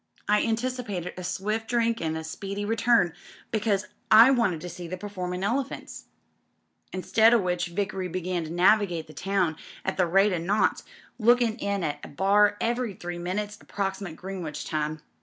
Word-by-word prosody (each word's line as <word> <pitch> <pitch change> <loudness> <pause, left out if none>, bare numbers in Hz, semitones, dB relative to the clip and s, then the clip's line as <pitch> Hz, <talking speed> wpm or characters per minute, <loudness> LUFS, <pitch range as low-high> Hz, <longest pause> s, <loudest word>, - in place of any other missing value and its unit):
I 210 0 +4
anticipated 230 -6 -2
a 185 - -7
swift 215 +5 -2
drink 230 -1 +1
an' 160 -1 -1
a 160 - -4
speedy 200 +5 -5
return, 225 -4 +3 0.4
because 210 -2 +1 0.2
I 230 +4 +9
wanted 230 -10 +2
to 180 - -6
see 175 0 -8
the 185 +2 -5
performin' 185 -2 -4
elephants. 255 +7 -3 0.9
Instead 220 +5 +4
o' - - +6
which 180 -3 -1
Vickery 190 +1 -2
began 180 0 -2
to - - -7
navigate 175 -1 +3
the 155 - -14
town 180 -1 0 0.3
at 190 - -1
the 185 - +4
rate^ 195 +4 +3
o' 175 - 0
knots, 195 +6 +1 0.4
lookin' 240 0 +4
in 200 -4 -2
at 145 -2 -3
a - - -6
bar 205 +6 +3
every 235 -3 -1
three 175 -3 -6
minutes 205 +4 -3
ap - - -19
proximate 195 -3 -3
Greenwich 180 -4 -6
time. 155 0 -2
195 Hz, 170 wpm, -27 LUFS, 175-215 Hz, 0.9 s, I